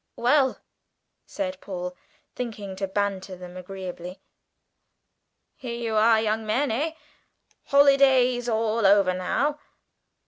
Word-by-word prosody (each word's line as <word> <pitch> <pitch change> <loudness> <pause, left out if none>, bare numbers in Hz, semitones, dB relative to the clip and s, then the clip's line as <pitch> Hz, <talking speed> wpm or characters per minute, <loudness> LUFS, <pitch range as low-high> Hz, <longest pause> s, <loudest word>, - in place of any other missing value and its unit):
"Well," 265 +2 +2 0.7
said 280 -2 -4
Paul, 180 -2 -6 0.4
thinking 210 -6 -5
to 195 0 -2
banter 195 -1 -2
them 180 0 -11
agreeably; 185 -1 -8 1.4
"here 235 -2 -6
you 230 -2 -3
are, 220 +1 +4
young 220 0 -1
men, 235 +5 0
eh? 300 +8 -1 0.7
Holidays 265 -3 +4
all 220 -1 +1
over 195 -2 +4
now! 285 +11 -1
220 Hz, 105 wpm, -25 LUFS, 190-255 Hz, 1.4 s, are